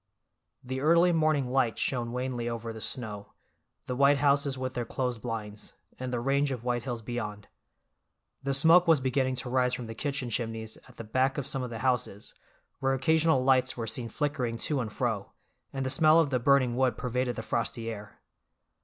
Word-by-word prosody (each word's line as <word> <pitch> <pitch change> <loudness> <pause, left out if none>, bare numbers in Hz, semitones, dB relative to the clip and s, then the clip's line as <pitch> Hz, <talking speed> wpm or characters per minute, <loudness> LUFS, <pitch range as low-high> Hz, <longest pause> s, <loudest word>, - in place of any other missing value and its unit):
The 130 +1 -4
early 170 +4 +5
morning 155 -6 +1
light 125 -5 +1
shone 120 -3 -1
wanly 125 -1 -3
over 115 -1 -5
the 110 - -9
snow, 105 -5 -3 0.5
the 125 - -3
white 140 +2 +5
houses 140 -1 +2
with 130 0 -3
their 125 - -2
closed 125 -1 -3
blinds, 110 -3 -6 0.3
and 130 0 -4
the 120 - -1
range 140 +3 +1
of 125 -3 -4
white 120 -1 0
hills 120 -3 -5
beyond. 105 -3 -5 0.9
The 135 0 0
smoke 165 +5 +6
was 160 -3 +5
beginning 130 0 0
to 125 - -3
rise 125 -1 +2
from 125 - -6
the 115 - -7
kitchen 135 0 -3
chimneys 110 -1 -3
at - - -17
the - - -6
back 130 +5 0
of 140 - -2
some 135 -1 -1
of 125 - -4
the 115 - -6
houses, 125 -5 -1 0.5
where 135 0 +1
occasional 160 0 +3
lights 130 -1 +3
were 115 - -3
seen 115 +1 -3
flickering 125 -3 -2
to 145 +4 0
and 115 -4 -3
fro, 110 -4 -2 0.4
and 135 -1 -3
the 130 - 0
smell 155 +1 +5
of 155 -4 +2
the 125 - +1
burning 130 -1 +3
wood 125 -3 +1
pervaded 125 0 -1
the 110 - -5
frosty 115 0 -2
air. 105 -1 -10
125 Hz, 195 wpm, -29 LUFS, 115-135 Hz, 0.9 s, smoke